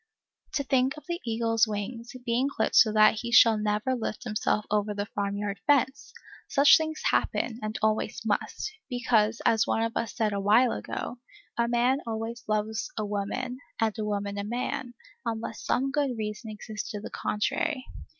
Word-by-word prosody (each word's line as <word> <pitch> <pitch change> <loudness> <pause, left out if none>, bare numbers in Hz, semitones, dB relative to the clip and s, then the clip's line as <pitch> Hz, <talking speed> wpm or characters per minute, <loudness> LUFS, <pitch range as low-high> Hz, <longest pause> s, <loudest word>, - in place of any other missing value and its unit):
To 280 - 0
think 265 +1 +1
of 300 - -11
the 345 +1 -3
eagle's 225 0 +2
wings, 230 +3 -5
being 245 +4 +1
clipped 230 -6 -1
so 225 -1 +7
that 215 0 +5
he 235 - -4
shall 230 -2 +7
never 210 +4 0
lift 235 -2 -3
himself 215 -2 0
over 210 0 +1
the 205 0 -2
farm 200 -1 -3
yard 200 -2 -3
fence! 280 -1 +2 0.4
Such 280 +1 +7
things 315 -1 -1
happen, 235 -1 0
and 215 0 -3
always 215 0 +1
must, 220 - -1 0.2
because, 230 -3 +1
as 225 0 +4
one 225 - +1
of 230 0 -2
us 225 -5 -2
said 215 -3 +1
awhile 210 +5 +4
ago, 245 - -5 0.4
a 235 0 +1
man 245 +3 +2
always 225 +1 -4
loves, 215 +1 -1
a 215 - -1
woman, 210 +5 -3 0.2
and 220 -2 +1
a - - -1
woman 205 -1 -2
a - - -2
man, 240 +2 -3 0.3
unless 225 -2 -4
some 270 +2 0
good 280 -4 0
reason 215 +1 -4
exists 215 0 -6
to 210 -3 -4
the 205 - -8
contrary. 255 +6 -1
225 Hz, 175 wpm, -28 LUFS, 210-245 Hz, 0.4 s, so